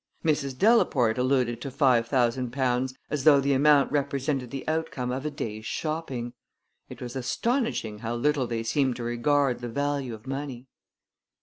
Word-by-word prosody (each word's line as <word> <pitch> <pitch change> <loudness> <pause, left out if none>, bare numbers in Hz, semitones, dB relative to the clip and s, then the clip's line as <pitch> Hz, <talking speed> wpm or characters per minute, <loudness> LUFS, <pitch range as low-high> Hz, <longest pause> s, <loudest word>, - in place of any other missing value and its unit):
Mrs. 140 -4 0
Delaporte 135 - +3
alluded 125 -2 +1
to 135 - -4
five 130 -4 +3
thousand 125 0 +1
pounds 130 0 0 0.2
as 150 -3 -1
though 145 -2 +7
the 140 +1 +1
amount 145 +1 +4
represented 140 -2 -1
the 135 +2 -6
outcome 155 -6 -2
of 135 +4 -3
a - - 0
day's 110 -7 -5
shopping. 135 -7 -3 0.6
It - - -9
was 120 0 -7
astonishing 135 - -1
how 115 +2 -3
little 140 +1 +1
they 115 -1 -2
seemed 130 +2 +1
to 120 - -6
regard 125 +2 +1
the 120 -1 -5
value 140 -1 -2
of 110 - -16
money! 135 -2 -5
130 Hz, 165 wpm, -27 LUFS, 120-145 Hz, 0.6 s, though